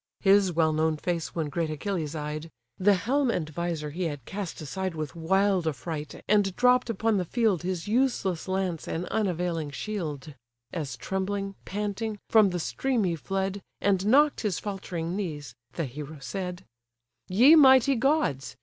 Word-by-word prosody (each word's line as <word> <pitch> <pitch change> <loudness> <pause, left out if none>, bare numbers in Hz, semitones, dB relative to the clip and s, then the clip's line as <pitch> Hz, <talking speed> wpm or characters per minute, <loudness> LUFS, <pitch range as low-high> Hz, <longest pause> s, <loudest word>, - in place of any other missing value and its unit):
His 195 -1 +5
well 160 -1 +2
known 155 0 +1
face 170 +1 -3
when 160 -3 -1
great 165 +1 -1
Achilles 155 -1 -3
eyed, 155 +1 -4 0.3
(The 200 +1 +5
helm 255 +8 +1
and 170 -9 -1
visor 160 -1 -3
he 175 +4 -3
had 145 -6 -4
cast 195 -3 -5
aside 175 +4 -4
With 155 0 -5
wild 190 +1 +2
affright, 150 +1 -5
and 200 -2 +3
dropp'd 250 0 +4
upon 225 0 +1
the 185 - +1
field 215 -1 +1
His 180 -1 -3
useless 215 -7 0
lance 185 -3 -2
and 170 +2 -3
unavailing 175 -6 -1
shield,) 155 -3 -5 0.4
As 145 -8 -4
trembling, 195 +7 -2
panting, 210 +2 -3
from 215 -3 +6
the 180 -1 -2
stream 250 +6 0
he 175 -3 0
fled, 195 +4 -3 0.2
And 195 -1 +1
knock'd 290 +5 +4
his 205 -6 -1
faltering 180 -4 -4
knees, 150 - -4 0.2
the 165 - -2
hero 150 +4 -7
said: 180 +4 -5 0.6
"Ye 245 - +7
mighty 265 -3 +7
gods! 270 - 0
185 Hz, 160 wpm, -27 LUFS, 160-205 Hz, 0.6 s, Ye